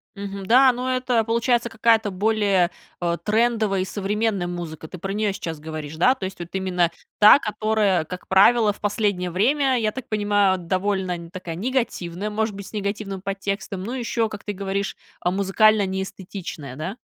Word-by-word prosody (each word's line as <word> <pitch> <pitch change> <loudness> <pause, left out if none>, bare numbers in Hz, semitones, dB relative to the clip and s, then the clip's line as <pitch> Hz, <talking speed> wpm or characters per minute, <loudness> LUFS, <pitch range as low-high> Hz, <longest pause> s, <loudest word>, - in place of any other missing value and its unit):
Мгм, 200 -1 -6
да, 255 +4 +7
ну 250 +1 -4
это 255 -2 +1
получается 235 +1 +1
какая-то 225 -1 +3
более, 200 -2 +2 0.3
э, 170 -1 0
трендовая 215 -2 +1
и - - -1
современная 205 -1 -1
музыка, 170 -3 -6
ты 185 - -9
про 195 +2 -4
неё 210 0 0
сейчас 170 -5 -5
говоришь, 155 -1 -6
да? 255 +10 +4
То 215 - -5
есть, 190 -1 -7
вот 170 -1 -6
именно 185 -3 +1 0.3
та, 210 +5 +9
которая, 215 - +1
как 180 +2 -8
правило, 210 +3 +5
в - - -18
последнее 205 -3 0
время, 260 - +2
я 215 -2 +1
так 260 +2 -8
понимаю, 205 -2 +2
довольно 185 -1 -2
такая 180 -2 -6
негативная, 205 -4 -2
может 215 0 -1
быть, 200 -1 -8
с - - -14
негативным 200 -2 -3
подтекстом, 195 0 -4
ну, 230 +5 -4
ещё, 235 -2 -1
как 215 -2 -9
ты 205 - -4
говоришь, 195 0 -3 0.3
музыкально 200 +3 +3
неэстетичная, 190 -7 -6
да? 170 - -5
200 Hz, 170 wpm, -23 LUFS, 185-220 Hz, 0.3 s, та